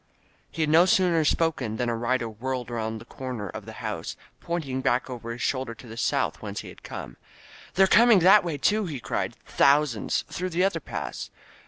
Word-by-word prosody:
He, 160 - -2
had 155 - 0
no 170 +3 +6
sooner 180 -4 +3
spoken 145 -8 0
than 125 - -1
a 120 - 0
rider 120 +1 0
whirled 125 +2 -4
around 110 -1 -3
the 110 - -11
comer 125 -6 -6
of - - -8
the - - -8
house, - - -4 0.2
pointing 145 -7 -3
back 130 +1 0
over 120 -2 -7
his 120 +2 -5
shoulder 130 -3 -1
to 120 - -14
the 115 -1 -9
south, 115 - 0
whence - - -5
he - - -10
had - - -14
come. - - -8 0.6
"They're 195 - +6
coming 230 +3 +6
that 195 +4 +7
way, 165 -4 -3
too," 210 +7 +1
he 145 -6 -5
cried. 100 - -3 0.2
Thou 145 +2 +6
sands! 115 -7 -2
Through 185 +1 -4
the 180 +1 +1
other 195 +1 +1
pass! - - -6
130 Hz, 205 wpm, -26 LUFS, 115-170 Hz, 0.6 s, that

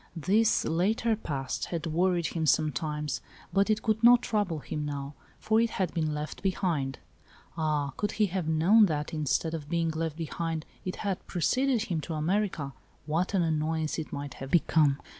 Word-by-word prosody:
This 205 +7 +2
later 215 +7 +1
past 140 -10 -3
had 170 -2 -4
worried 175 +1 +1
him 160 -2 -1
sometimes, 150 -1 0 0.3
but 195 +2 +3
it 215 0 +1
could 220 0 0
not 245 +1 +7
trouble 205 -7 0
him 150 +2 -4
now, 140 -1 -4 0.2
for 220 +1 +2
it 230 - +2
had 185 -6 -2
been 155 -3 0
left 150 0 -5
behind. 170 -8 -1 0.6
Ah, 150 -3 0
could 205 - -1
he 215 - +3
have 185 -3 -2
known 180 +8 +5
that, 150 -2 -3
instead 155 +1 0
of 150 -3 -5
being 165 -1 +1
left 160 -1 -3
behind, 165 -1 -3 0.2
it 185 - -3
had 195 -2 -1
preceded 250 +6 +1
him 170 -8 -2
to 160 +2 -5
America, 160 -3 -1 0.3
what 170 +6 0
an 180 - +3
annoyance 160 0 0
it 155 - -6
might 140 -1 -5
have 135 +1 -8
become 150 -4 +3
165 Hz, 175 wpm, -29 LUFS, 150-195 Hz, 0.6 s, not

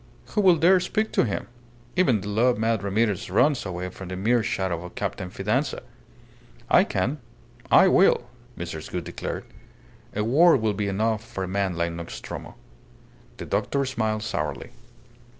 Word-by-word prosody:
"Who 210 - +1
will 185 -3 +6
dare 180 +4 +5
speak 215 +4 -1
to - - +2
him? 105 - -3 0.5
Even 130 - +3
the 105 - -7
love 115 +4 +2
mad 110 -1 +1
Ramirez 100 -1 0
runs 130 +5 +2
away 90 0 -4
from 95 +1 -9
the 95 - -5
mere 115 +6 +2
shadow 95 -5 -2
of 90 - -10
Captain 90 - -3
Fidanza." 110 +10 -1 0.9
"I - - +7
can. 120 +11 -1 0.5
I 190 - +7
will," 185 -9 +4 0.3
Mrs. 85 -2 -6
Gould - - -3
declared. - - -5 0.7
"A 105 - 0
word 145 +7 +5
will 110 -1 0
be 100 0 -2
enough 110 +2 0
for 95 -4 -5
a - - -3
man 95 -1 -1
like 85 0 -1
Nostromo." 85 0 -7 0.8
The - - -6
doctor 140 -1 0
smiled 110 -4 -1
sourly. 75 -10 -3
110 Hz, 160 wpm, -25 LUFS, 95-130 Hz, 0.9 s, I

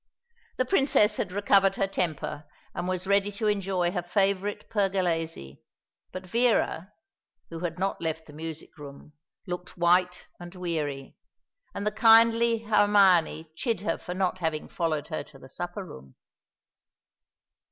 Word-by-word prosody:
The 255 - +1
Princess 255 - +3
had 180 - -2
recovered 195 0 +3
her 195 - +1
temper, 165 -6 -3 0.3
and 175 - -4
was 185 0 -2
ready 200 +1 +2
to 215 +2 -4
enjoy 190 -4 0
her 180 -1 -2
favourite 195 +2 -1
Pergolesi; 175 - -1 0.5
but 185 0 -7
Vera, 215 -4 +1 0.6
who 165 - -6
had 170 0 -4
not 195 +2 -2
left 160 -1 -3
the 150 - -14
music 160 +2 -8
room, 145 +1 -11 0.3
looked 180 -1 -7
white 180 +1 +2
and 175 +1 -10
weary; 155 -6 -4 0.6
and 200 - -4
the 210 - +1
kindly 230 +1 +5
Hermione 195 -7 +3
chid 230 +5 -2
her 210 - -2
for 180 - -6
not 185 0 -1
having 160 -3 -2
followed 160 -3 -2
her 155 - -3
to 140 - -17
the 130 - -14
supper 175 +7 -6
room. 65 - -13
180 Hz, 140 wpm, -27 LUFS, 165-200 Hz, 0.6 s, kindly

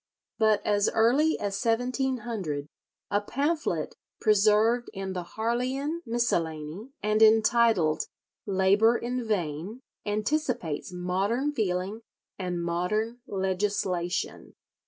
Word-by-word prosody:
But 215 -2 +3
as 205 -1 +3
early 270 +8 +3
as 205 +1 -2
1700 230 - -1 0.4
a 205 - +2
pamphlet 290 +9 -1 0.2
preserved 215 +3 +3
in 190 0 -4
the 180 - -3 0.2
"Harleian 255 +8 -1
Miscellany," 175 - -1
and 215 +1 +2
entitled 220 -7 +4 0.4
"Labour 200 +4 +4
in 245 +1 -3
Vain," 195 - -3 0.2
anticipates 210 - -1
modern 195 +10 -1
feeling 200 -2 -1 0.4
and 180 -2 -2
modern 215 +8 -1
legislation. 190 -2 -2
215 Hz, 95 wpm, -28 LUFS, 185-240 Hz, 0.4 s, entitled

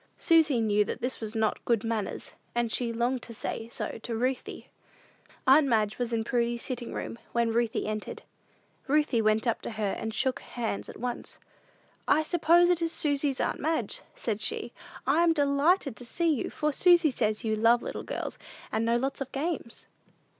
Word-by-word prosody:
Susy 320 -6 +4
knew 210 -2 +3
that - - -5
this 250 +2 -3
was 220 0 -5
not 220 -1 0
good 230 -3 +1
manners, 225 -4 -3 0.2
and 240 -1 0
she 235 0 0
longed 240 +2 0
to 230 0 -9
say 225 +1 -4
so 235 - -4
to 230 - -4
Ruthie. 255 +3 -3 0.7
Aunt 280 +2 +6
Madge 215 -3 +1
was 240 -1 -1
in 225 -1 0
Prudy's 235 0 0
sitting 245 -2 -5
room 230 - -5
when 235 -1 +2
Ruthie 235 -1 0
entered. 215 0 -4 0.6
Ruthie 290 -4 +2
went 215 +2 +2
up 230 - 0
to - - -5
her 215 -3 -2
and 225 -1 -3
shook 260 +3 0
hands 230 -4 -4
at - - -9
once. 245 +1 -5 0.7
"I 315 - +4
suppose 345 +1 +4
it 350 -1 +1
is 330 -1 0
Susy's 285 -4 +1
aunt - - -1
Madge," 325 - -1
said 215 -2 -3
she. 235 +2 -2 0.3
"I 285 +6 +3
am 340 -1 +4
delighted 285 - +2
to - - -7
see 330 +7 +1
you, 270 - -2
for 300 -1 -1
Susy 345 -1 +5
says 215 -3 -1
you 220 -1 0
love 230 +2 +4
little - - -4
girls, - - -5 0.3
and 220 - 0
know 235 +1 +3
lots 270 +3 -2
of 270 -1 -4
games." 280 -5 -4
240 Hz, 185 wpm, -28 LUFS, 225-290 Hz, 0.7 s, Aunt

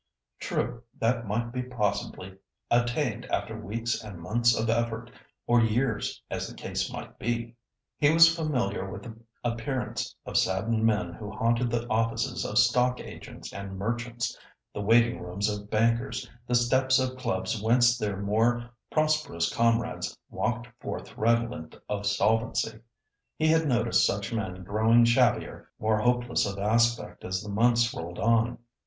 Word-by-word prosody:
True 120 +1 -2 0.2
that 115 0 +1
might 120 +3 -1
be 125 0 -2
possibly 105 -5 -3 0.4
attained 120 0 +1
after 110 -2 -2
weeks 115 +2 -3
and 100 -5 -9
months 115 +6 +2
of 110 - 0
effort, 115 +1 -1 0.3
or 120 0 +4
years, 115 +1 0
as - - -2
the - - -10
case - - -3
might - - -8
be. 115 +1 -2 0.4
He 145 0 +5
was 165 0 +7
familiar 125 - -1
with - - -7
the 115 -3 -9 0.3
appearance 120 +2 -3
of - - -1
saddened 110 +4 +1
men 105 -6 0
who 105 +3 -7
haunted 115 +3 +1
the 120 0 -1
offices 115 0 0
of 105 - -2
stock 125 +1 +4
agents - - -9
and 100 -1 -6
merchants—the 120 0 -5
waiting 115 +3 +3
rooms 90 +4 -2
of 105 -1 -4
bankers, 115 +4 +1 0.2
the 125 - +1
steps 130 +2 +3
of 130 -1 0
clubs 115 -4 -2
whence 120 +2 +4
their 105 -5 -2
more 115 +4 +1 0.2
prosperous 155 - +1
comrades 115 -1 0
walked 120 +2 -2
forth - - -6
redolent 115 +2 0
of 100 -1 -2
solvency. 110 +1 +1 0.6
He 155 0 +2
had 160 0 +3
noticed 120 -3 +3
such 100 +3 0
men 95 -5 -3
growing 110 +5 +4
shabbier, 115 0 +2
more 110 0 +1
hopeless 120 -1 +1
of 100 0 -4
aspect 115 +3 +1
as 95 +2 -3
the 105 - -7
months 115 +3 +3
rolled 85 +1 -6
on. 115 +1 +2
115 Hz, 150 wpm, -28 LUFS, 105-120 Hz, 0.6 s, was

